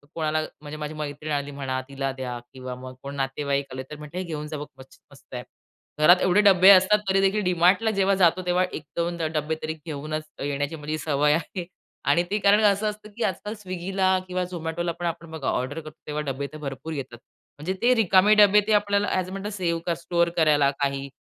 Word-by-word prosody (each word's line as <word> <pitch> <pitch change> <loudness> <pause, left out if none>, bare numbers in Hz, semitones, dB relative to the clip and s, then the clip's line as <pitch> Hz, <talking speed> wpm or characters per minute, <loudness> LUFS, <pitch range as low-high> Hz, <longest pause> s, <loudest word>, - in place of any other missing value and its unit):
कोणाला 155 -1 0 0.2
म्हणजे 150 0 -8
माझी 150 0 -5
मैत्रीण 150 0 -5
आली 145 -1 -2
म्हणा 135 -2 -3
तिला 135 -1 -3
द्या 125 -2 -4 0.2
किंवा 130 -1 -7
मग 130 0 -9
कोण 140 +1 -6
नातेवाईक 140 +1 -1
आले 130 0 -5
तर 150 - -7
म्हणते, 150 +3 -9
"हे 185 - -1
घेऊन 155 -4 -5
जा 155 0 -5
बघ 145 - -5
मस् 130 0 -16
मस्त - - -18
आहे." - - -4 0.6
घरात 175 +3 +7
एवढे 185 +3 +4
डब्बे 190 -2 +7
असतात, 200 +2 +7
तरी 190 +1 +3
देखील 195 +2 +2
डीमार्टला 180 +4 +3
जेव्हा 195 -1 +2
जातो 180 -1 +3
तेव्हा 180 +1 +2
1-2 170 +3 -3
ड - - -5
डब्बे 155 +1 -1
तरी 155 0 -2
घेऊनच 155 0 -4 0.2
येण्याची 145 +2 -2
माझी 155 0 -4
सवय 150 -1 +2
आहे 170 +2 -3 0.5
आणि 175 - +3
ते 210 - +2
कारण 205 +1 +5
असं 205 +1 +3
असतं 210 0 -9
की 235 - -1
आजकाल 210 +2 -2
स्विगीला 190 -1 0
किंवा 185 0 -1
झोमॅटोला 170 -1 -3
पण 175 - -3
आपण 165 -1 -4
बघा 160 -4 -5
ऑर्डर 130 +5 -2
करतो 155 -1 -10
तेव्हा 150 0 -2
डब्बे 140 +2 -4
तर - - -7
भरपूर 145 +1 -6
येतात. 135 -5 -6 0.4
म्हणजे 170 +6 -2
ते 245 +2 +5
रिकामे 205 -2 +5
डब्बे 210 0 +7
ते - - +1
आपल्याला 205 0 +2
असं 185 0 -1
म्हणतात 195 +2 -5
सेव्ह 170 -3 -1
स्टोअर 170 +1 0
करायला 150 -4 +4
काही 140 -1 -1
165 Hz, 205 wpm, -25 LUFS, 145-190 Hz, 0.6 s, घरात